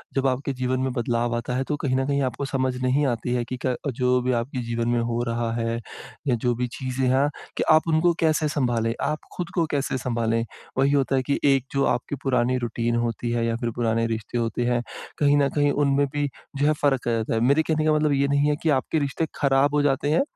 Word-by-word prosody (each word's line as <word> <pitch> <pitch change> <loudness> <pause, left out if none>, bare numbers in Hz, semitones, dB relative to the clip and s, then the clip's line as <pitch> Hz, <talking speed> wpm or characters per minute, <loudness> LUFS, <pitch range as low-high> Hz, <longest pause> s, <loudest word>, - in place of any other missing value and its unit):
जब 135 0 +2
आपके 135 +2 -1
जीवन 130 0 -1
में 130 0 0
बदलाव 120 -1 0
आता 120 +2 -3
है, 130 - 0
तो 150 - -2
कहीं 130 -2 -1
न 135 0 +1
कहीं 140 0 +1
आपको 130 +2 -2
समझ 130 -1 -1
नहीं 135 +3 +2
आती 120 0 -1
है 125 -1 0
कि 130 +2 -5
क 130 -1 +1 0.2
जो 125 0 +2
भी 125 +1 0
आपके 125 +2 -4
जीवन 115 0 -1
में 120 0 +2
हो 115 0 -1
रहा 115 0 -1
है 115 0 -1 0.5
या 125 - +3
जो 120 +1 0
भी 125 +1 -1
चीज़ें 130 0 -1
हैं 135 +3 +3 0.3
कि - - +1
आप 155 +1 +4
उनको 165 +2 +3
कैसे 155 -1 +2
सँभालें, 120 -6 0
आप 150 +2 -1 0.2
खुद 175 -1 -4
को 170 -3 +2
कैसे 140 -2 -1
सँभालें? 115 -2 0 0.3
वही 135 +1 +3
होता 135 -1 +2
है 130 - +2
कि 140 - +2
एक 135 -2 +3
जो 140 0 +2
आपकी 125 +4 -5
पुरानी 130 -1 +1
रूटीन 120 -1 -1
होती 120 +1 -3
है 120 -1 0
या 115 0 0
फिर 120 0 -2
पुराने 115 -1 +1
रिश्ते 110 +1 -3
होते 115 +1 -1
हैं, 120 0 +1 0.4
कहीं 145 -1 +4
न 140 -1 +3
कहीं 145 -1 +3
उनमें 140 0 +2
भी 145 0 0 0.3
जो 145 +1 +2
है 155 - +4
फ़र्क 135 -4 +1
आ - - +2
जाता 115 -1 -1
है। 110 - +1
मेरे 140 +6 +4
कहने 155 -1 0
का 155 - +4
मतलब 150 -1 +2
ये 140 0 +2
नहीं 140 +1 +2
है 150 - +2
कि 160 - +2
आपके 160 - -2
रिश्ते 140 +3 -1
खराब 140 +1 +2
हो 145 - +3
जाते 145 0 +1
हैं, 160 - +4
130 Hz, 245 wpm, -24 LUFS, 120-145 Hz, 0.5 s, आप